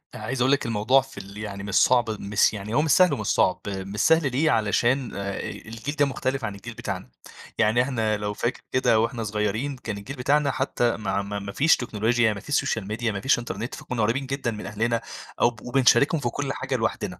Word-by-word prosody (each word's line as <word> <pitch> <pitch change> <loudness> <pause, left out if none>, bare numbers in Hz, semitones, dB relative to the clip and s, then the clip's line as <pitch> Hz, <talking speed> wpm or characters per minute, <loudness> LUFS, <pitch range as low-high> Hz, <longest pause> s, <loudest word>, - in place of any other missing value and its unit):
أنا 105 - -8
عايز 125 +3 -2
أقول 130 - +3
لِك 140 - +2
الموضوع 115 +4 +3
في 135 -3 -15
ال 100 0 -9
يعني 100 -2 -6
مش 100 -1 -3
صعب 120 -2 +4
مس 100 +2 +2
يعني 105 +1 -5
هو 150 - +4
مش 155 - +1
سهل 185 -1 +5
ومش - - -3
صعب، - - +2
مش 100 +1 -5
سهل 160 -4 +4
ليه، 150 +5 +2
علشان 120 +4 +1
آآ، 100 0 -3
آآ - - -5
الجيل 115 +6 -7
ده 145 -2 +3
مُختلف 130 -1 -2
عن 105 -2 -4
الجيل 120 +4 -9
بتاعنا، 95 - -5 0.5
يعني 110 +3 +3
إحنا 115 -5 0
لو 105 0 -3
فاكر 120 +4 -2
كده 120 -3 +3
وإحنا 115 +1 -1
صغيرين، 110 +6 -1
كان 110 -4 -5
الجيل 115 +7 -7
بتاعنا 140 +2 +2
حتى 120 -2 0
ماع 100 -2 -1
ما 100 0 -4
ما 100 0 -6
فيش 150 +9 +4
تكنولوجيا، 115 -1 +1
ما 100 - -7
فيش 145 +8 -3
سوشيال 110 -4 0
ميديا 110 +2 -1
ما 100 - -4
فيش 135 +2 +3
إنترنت 120 -1 -5
فكُنّا 120 -3 -4
قريِّبين 120 +6 +1
جدًا 135 -3 -2
من 105 - -7
أهلنا 115 +2 -1 0.4
أو - - +6
ب 115 -2 -14
وبنشاركهم 135 +5 +3
في 120 - 0
كل 135 +2 -3
حاجة 135 0 -3
لوحدنا 115 -2 -2
115 Hz, 225 wpm, -25 LUFS, 105-135 Hz, 0.5 s, أو